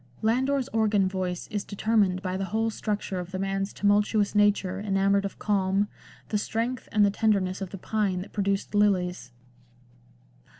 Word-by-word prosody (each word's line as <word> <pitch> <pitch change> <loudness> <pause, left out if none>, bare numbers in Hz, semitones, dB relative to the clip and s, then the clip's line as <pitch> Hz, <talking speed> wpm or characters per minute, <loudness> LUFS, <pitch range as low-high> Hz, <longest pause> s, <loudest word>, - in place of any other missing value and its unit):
Landor's 260 +4 +1
organ 210 -3 +2
voice 185 -2 -3
is 205 -1 -2
determined 200 -3 +1
by 185 -1 -2
the 195 +1 -2
whole 225 +3 0
structure 205 -3 -3
of 180 -1 -6
the 185 - -4
man's 195 +1 -2
tumultuous 205 0 +2
nature 205 -2 +2
enamoured 200 0 +1
of 200 - -5
calm, 200 0 +1 0.4
the 210 - 0
strength 230 +4 -3
and 210 -2 +4
the 200 - +2
tenderness 195 -3 +1
of 190 - -4
the 195 - -7
pine 195 -2 -1
that 190 - -10
produced 200 -1 -1
lilies. 185 -9 +1
200 Hz, 160 wpm, -27 LUFS, 190-215 Hz, 0.4 s, and